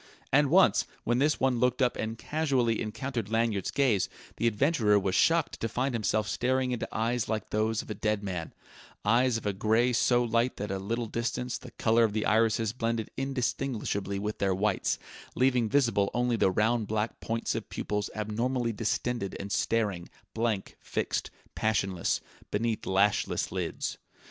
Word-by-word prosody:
And 145 +1 +4
once, 165 - +5 0.2
when 120 +1 +1
this 150 +2 +2
one 130 -2 +2
looked 125 +1 +2
up 125 -2 +2
and 110 +1 -3
casually 130 -6 0
encountered 115 0 -3
Lanyard's 115 -4 0
gaze, 130 -9 +2 0.3
the 115 - +2
adventurer 115 -2 +3
was 95 -2 0
shocked 165 - +2
to 115 - -2
find 130 +3 -1
himself 110 -1 0
staring 130 +4 0
into 120 - -3
eyes 115 +1 -1
like 110 -1 -3
those 110 +1 0
of - - -9
a - - 0
dead 105 -1 -1
man: 90 -5 -4 0.5
eyes 120 +3 +3
of 115 - -8
a 100 - 0
grey 110 +5 +2
so 120 +1 +3
light 120 +2 +1
that 105 -1 -4
at 95 - -1
a - - -6
little 115 +4 -1
distance 120 +2 -3
the 125 - -10
colour 115 0 +2
of 110 -2 +1
the 110 0 0
irises 110 0 +2
blended 115 -2 -2
indistinguishably 125 -6 -2
with 105 +2 -3
their 95 -1 +1
whites, 100 0 0 0.4
leaving 125 -3 +2
visible 115 -7 +2
only 120 0 +2
the 95 - +3
round 110 +3 +1
black 110 +1 -2
points 115 +1 -2
of - - -5
pupils 105 0 -2
abnormally 115 +3 -1
distended 110 -1 -2
and 100 0 -6
staring, 100 -3 0 0.2
blank, 110 -3 -2
fixed, - - -2 0.2
passionless, 95 -5 0 0.3
beneath 115 +1 -1
lashless 100 +2 +1
lids. - - -3
115 Hz, 170 wpm, -29 LUFS, 105-125 Hz, 0.5 s, once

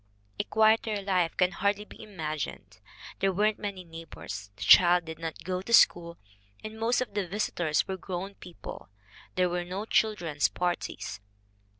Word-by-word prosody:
A - - +2
quieter 220 -1 +3
life 185 -4 +1
can 180 0 +3
hardly 200 +2 0
be - - -13
imagined. 155 -7 -5 0.4
There 195 0 +2
weren't 210 +3 +1
many 200 -3 -5
neighbors, 165 - -8
the - - -7
children 175 -1 +7
did 160 0 -8
not 165 -1 -6
go 185 +1 -2
to 230 +5 -4
school, 170 -6 +5 0.5
most 225 +3 0
of 250 - -4
the 200 -3 -1
visitors 175 -5 0
were 190 - -3
grown 185 +2 -5
people, 170 - -10 0.5
there 185 0 +3
were 175 0 -2
no 185 +4 -5
children's 175 -10 +1
parties. 175 -10 -3
185 Hz, 155 wpm, -29 LUFS, 170-205 Hz, 0.5 s, children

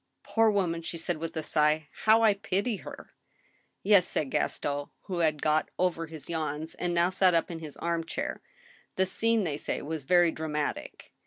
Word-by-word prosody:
" - - -51
Poor 225 0 +3
woman," 180 -5 0
she 170 +1 -5
said, 170 0 -1
witli 165 +2 -5
a 160 - -2
sigh, 150 0 +2
" - - -37
how 220 +1 +6
I 215 -2 +6
pity 200 +2 -1
her! - - -10 0.2
" - - -37
" - - -41 0.2
Yes," 200 -3 +5
said 140 -4 -1
Gaston, 145 0 -1 0.2
who 180 -2 -4
had 155 -3 +1
got 155 0 +2
over 170 -2 0
his 155 -3 -9
yawns, 160 -1 -3
and 175 -1 -2
now 170 +2 +3
sat 185 -1 +4
up 165 - +1
in 165 - -5
his 155 -3 -8
arm 170 -1 -1
chair, - - -4 0.3
" 485 - -28
the 190 - +2
scene 225 +3 +1
they 150 -5 -2
say - - -2
was 155 -1 -4
very 175 +2 +5
dramatic. 150 -2 -4
165 Hz, 215 wpm, -29 LUFS, 155-190 Hz, 0.3 s, how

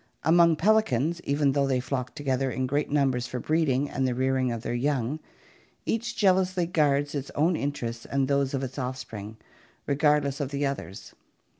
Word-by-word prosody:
Among 170 +1 +5
pelicans, 170 - +2
even 140 0 +2
though 140 0 +1
they 130 -2 +1
flock 125 -1 -4
together 135 -2 -1
in 130 0 -2
great 145 +3 -1
num 140 -2 +2
bers 125 -1 -3
for 125 - -4
breeding 145 -1 +1
and 135 -2 -1
the 125 - -1
rearing 130 0 +1
of 115 -1 -4
their - - -2
young, 135 +2 -1 0.7
each 230 0 -2
jealously 185 -3 +2
guards 145 -4 +1
its 140 -2 -4
own 165 +4 +2
interests 120 -6 -4
and 135 -1 0
those 140 -1 +1
of 135 - -2
its 135 +2 -5
offspring, 115 -5 -6 0.5
regardless 145 -1 +2
of 140 -3 -2
the 140 0 -1
others. 95 -8 -5
140 Hz, 175 wpm, -27 LUFS, 130-150 Hz, 0.7 s, Among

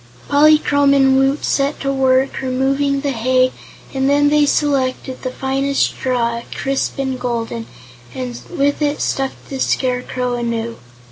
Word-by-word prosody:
Polychrome 285 -1 +4
and 270 -1 +4
Woot 270 +2 +2
set 280 +1 0
to 275 0 -1
work 265 0 +1
removing 275 +2 0
the 280 -1 -1
hay 255 +1 +2 0.4
and 265 0 +1
then 290 0 +4
they 295 0 +3
selected 265 -3 0
the 255 - -3
finest 270 +2 0
straw, 235 -2 -1
crisp 275 0 -2
and 265 -2 -2
golden, 235 -2 -3 0.5
and 250 -2 -5
with 285 -3 0
it 295 0 0
stuffed 270 -1 -3
the 270 - -4
Scarecrow 250 -1 -1
anew. 235 -1 -3
265 Hz, 140 wpm, -18 LUFS, 255-280 Hz, 0.5 s, Polychrome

